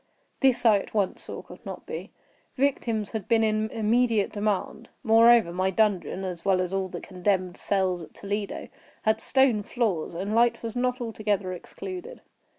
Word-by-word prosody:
This 265 Hz, -3 st, +3 dB
I 215 Hz, -3 st, +6 dB
at 195 Hz, -, -10 dB
once 200 Hz, -3 st, 0 dB
saw -, -, -7 dB
could -, -, -14 dB
not -, -, -8 dB
be. -, -, -6 dB, 0.5 s
Victims 235 Hz, -6 st, 0 dB
had 220 Hz, -4 st, -4 dB
been 225 Hz, -1 st, +3 dB
in 215 Hz, 0 st, +1 dB
immediate 225 Hz, -1 st, +2 dB
demand. 205 Hz, -2 st, -2 dB
Moreover, 230 Hz, -4 st, +6 dB
my 185 Hz, +1 st, +1 dB
dungeon, 195 Hz, -2 st, +1 dB
as 180 Hz, -3 st, -5 dB
well 190 Hz, -2 st, +3 dB
as 180 Hz, 0 st, -1 dB
all 195 Hz, -1 st, 0 dB
the 175 Hz, -1 st, -6 dB
condemned 185 Hz, -1 st, -1 dB
cells 190 Hz, -4 st, 0 dB
at 160 Hz, -, -12 dB
Toledo, 200 Hz, 0 st, -4 dB, 0.4 s
had 220 Hz, 0 st, +2 dB
stone 265 Hz, -5 st, +3 dB
floors, 200 Hz, -8 st, -1 dB
and 195 Hz, +5 st, -3 dB
light 235 Hz, +1 st, +3 dB
was 230 Hz, 0 st, -4 dB
not 250 Hz, +1 st, 0 dB
altogether 210 Hz, -5 st, -1 dB
excluded. 370 Hz, -, -8 dB
210 Hz, 165 wpm, -26 LUFS, 190-230 Hz, 0.5 s, I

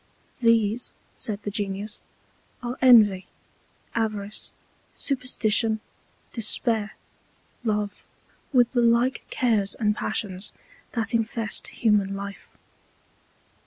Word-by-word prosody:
These, 230 Hz, 0 st, +2 dB, 0.2 s
said 210 Hz, -1 st, -4 dB
the 205 Hz, -, -3 dB
Genius, 205 Hz, +1 st, -3 dB, 0.6 s
are 240 Hz, +1 st, -3 dB
Envy, 215 Hz, -7 st, +7 dB, 0.7 s
Avarice, 215 Hz, -2 st, -2 dB, 0.4 s
Superstition, 225 Hz, -4 st, +1 dB, 0.5 s
Despair, 220 Hz, -1 st, +1 dB, 0.7 s
Love, 210 Hz, -2 st, -1 dB, 0.5 s
with 245 Hz, -3 st, +4 dB
the 245 Hz, -, +2 dB
like 235 Hz, +3 st, +3 dB
Cares 215 Hz, -6 st, +1 dB
and 210 Hz, -2 st, +1 dB
Passions 205 Hz, -3 st, -3 dB, 0.4 s
that 230 Hz, 0 st, -1 dB
infest 225 Hz, -1 st, 0 dB
human 205 Hz, -3 st, +2 dB
Life. 200 Hz, 0 st, -7 dB
220 Hz, 90 wpm, -25 LUFS, 205-235 Hz, 0.7 s, Envy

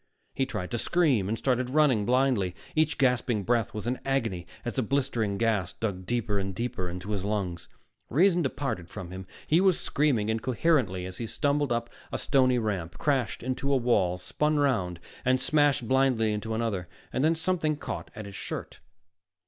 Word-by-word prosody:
He 135 Hz, -, 0 dB
tried 90 Hz, -6 st, -4 dB
to 120 Hz, -, -1 dB
scream, 135 Hz, -, +2 dB
and 110 Hz, -, 0 dB
started 125 Hz, -1 st, 0 dB
running, 130 Hz, -7 st, +3 dB
blindly. 125 Hz, -8 st, +2 dB, 0.2 s
Each 155 Hz, 0 st, +2 dB
gasping 125 Hz, -5 st, +2 dB
breath 115 Hz, +1 st, +1 dB
was 105 Hz, -1 st, -5 dB
an 125 Hz, +1 st, -1 dB
agony 115 Hz, -11 st, -1 dB, 0.2 s
as 120 Hz, -, -2 dB
the 130 Hz, -, 0 dB
blistering 120 Hz, -5 st, 0 dB
gas 105 Hz, -5 st, +1 dB
dug 95 Hz, -5 st, -4 dB
deeper 115 Hz, -4 st, 0 dB
and 95 Hz, -1 st, -3 dB
deeper 95 Hz, -5 st, -2 dB
into 90 Hz, +4 st, -6 dB
his 100 Hz, -3 st, -1 dB
lungs. 100 Hz, -5 st, -2 dB, 0.4 s
Reason 175 Hz, -, +4 dB
departed 130 Hz, -, -2 dB
from 95 Hz, -5 st, -7 dB
him; 95 Hz, 0 st, -7 dB, 0.2 s
he 165 Hz, +4 st, +4 dB
was 190 Hz, -3 st, +4 dB
screaming 130 Hz, -8 st, +1 dB
incoherently 115 Hz, -, +1 dB
as 95 Hz, 0 st, -7 dB
he 115 Hz, -, -3 dB
stumbled 145 Hz, +2 st, 0 dB
up 120 Hz, 0 st, 0 dB, 0.2 s
a -, -, -1 dB
stony 130 Hz, -2 st, +3 dB
ramp, 95 Hz, -7 st, -2 dB
crashed 135 Hz, -8 st, 0 dB
into 130 Hz, +2 st, -1 dB
a 135 Hz, -, +4 dB
wall, 105 Hz, -8 st, +2 dB
spun 150 Hz, +11 st, 0 dB
around 95 Hz, -12 st, +1 dB, 0.2 s
and 130 Hz, 0 st, +3 dB
smashed 145 Hz, -6 st, +2 dB
blindly 130 Hz, -4 st, +3 dB
into 110 Hz, +1 st, -3 dB
another. 110 Hz, -6 st, -1 dB, 0.3 s
Then 155 Hz, +5 st, +3 dB
something 160 Hz, -2 st, 0 dB
caught 145 Hz, -, -6 dB
at 110 Hz, -, -6 dB
his 100 Hz, -1 st, -9 dB
shirt. -, -, -6 dB
120 Hz, 175 wpm, -28 LUFS, 100-135 Hz, 0.4 s, Reason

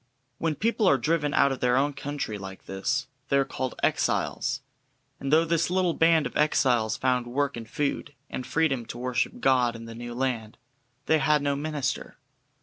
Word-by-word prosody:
When 160 Hz, -2 st, 0 dB
people 225 Hz, +1 st, +1 dB
are 140 Hz, -, +5 dB
driven 150 Hz, 0 st, 0 dB
out 140 Hz, -1 st, +4 dB
of 135 Hz, -, -3 dB
their 125 Hz, 0 st, +2 dB
own 145 Hz, +2 st, +2 dB
country 140 Hz, -6 st, -4 dB
like 95 Hz, -1 st, -9 dB
this, 120 Hz, +8 st, -1 dB, 0.2 s
they 140 Hz, -, +3 dB
are 135 Hz, -, +3 dB
called 130 Hz, -1 st, -4 dB
"exiles," -, -, 0 dB, 0.6 s
and 135 Hz, -, -3 dB
though 160 Hz, +2 st, +5 dB
this 165 Hz, 0 st, +1 dB
little 180 Hz, -1 st, +2 dB
band 165 Hz, -1 st, +4 dB
of -, -, -5 dB
exiles 125 Hz, -7 st, +2 dB
found 125 Hz, -2 st, +1 dB
work 140 Hz, +3 st, -1 dB
and 115 Hz, -1 st, -8 dB
food, 145 Hz, +1 st, -2 dB
and 130 Hz, -, -5 dB
freedom 140 Hz, -7 st, +1 dB
to -, -, -7 dB
worship 125 Hz, 0 st, -1 dB
God 125 Hz, -3 st, +3 dB
in 115 Hz, 0 st, -8 dB
the 115 Hz, -, -8 dB
new 120 Hz, +1 st, -7 dB
land, 120 Hz, -4 st, -2 dB, 0.5 s
they 160 Hz, -, +3 dB
had 150 Hz, +1 st, +3 dB
no 140 Hz, -1 st, +1 dB
minister. 145 Hz, -2 st, -3 dB
135 Hz, 185 wpm, -27 LUFS, 120-150 Hz, 0.6 s, are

